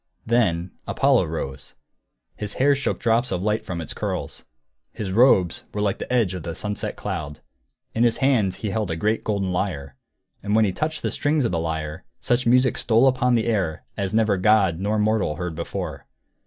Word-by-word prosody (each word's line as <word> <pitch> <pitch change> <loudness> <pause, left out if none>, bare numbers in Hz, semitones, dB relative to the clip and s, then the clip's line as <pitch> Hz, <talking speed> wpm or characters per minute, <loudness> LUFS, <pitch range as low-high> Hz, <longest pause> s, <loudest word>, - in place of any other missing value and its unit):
Then 95 -7 +1 0.2
Apollo - - +3
rose. 65 -1 -6 0.6
His 105 -1 -4
hair 140 +2 +3
shook 140 +1 -1
drops 120 +1 +1
of 90 - -2
light 105 +1 0
from 90 -3 -5
its 80 - -5
curls; - - -4 0.5
his 100 -3 -5
robes 95 -6 +4
were 105 - -1
like 100 -2 0
the - - -6
edge 115 -7 +2
of 90 - -5
the 85 0 -5
sunset 105 +2 -4
cloud; 80 -7 -5 0.5
in 115 - -1
his 120 -1 +3
hands 120 -9 +2
he 105 - -1
held 110 -2 -1
a 80 - -1
golden 100 0 -1
lyre. 75 -8 -3 0.5
And 105 +1 0
when 110 0 +5
he 100 - 0
touched 155 - -3
the - - 0
strings 145 -2 +1
of - - 0
the 85 - 0
lyre, 80 -2 -4 0.2
such 120 0 0
music 125 +1 +3
stole 115 +3 +4
upon 125 -1 +3
the 115 - +1
air 95 -9 -1
as 100 -1 -2
never 110 -2 +2
god 95 -4 +3
nor 105 +3 0
mortal 105 -7 +1
heard 90 +1 -4
before. 85 -2 -5
105 Hz, 190 wpm, -23 LUFS, 90-115 Hz, 0.6 s, when